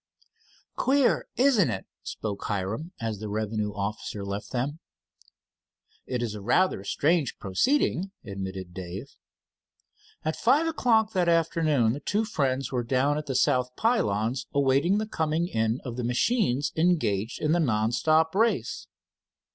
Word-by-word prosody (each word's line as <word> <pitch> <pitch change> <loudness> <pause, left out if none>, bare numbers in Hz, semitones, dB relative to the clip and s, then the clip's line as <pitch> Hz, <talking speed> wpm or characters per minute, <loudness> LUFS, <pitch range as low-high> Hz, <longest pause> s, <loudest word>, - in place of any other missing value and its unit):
"Queer, 270 0 +2
isn't 245 - +4
it?" 95 -4 -4 0.2
spoke 100 -2 -5
Hiram, 105 - -3
as 110 -3 -3
the 105 0 -5
revenue 105 0 -2
officer 100 0 -4
left 100 +1 -5
them. 140 +5 -2 1.3
"It 125 -2 -2
is 115 -3 -3
a 105 - -7
rather 120 - +2
strange 150 - +1
proceeding," 195 - +1 0.2
admitted 95 -3 -6
Dave. 95 +8 -7 1.1
At - - 0
five 305 +4 +3
o'clock 230 -9 +2
that 180 -3 +2
afternoon 155 -8 +2
the 140 - -5
two 210 +8 0
friends 135 -7 -1
were 125 -2 -1
down 135 +5 +1
at 150 - -8
the 135 - -2
south 125 0 +2
pylons 120 - 0
awaiting 140 +7 +3
the 215 - -1
coming 160 -4 -1
in 115 -4 0
of 120 -2 -5
the 125 - -2
machines 145 - +1
engaged 150 - +1
in 150 - 0
the 175 - +3
non 110 -7 +1
stop 160 +5 +2
race. 225 +4 0
130 Hz, 140 wpm, -27 LUFS, 110-170 Hz, 1.3 s, isn't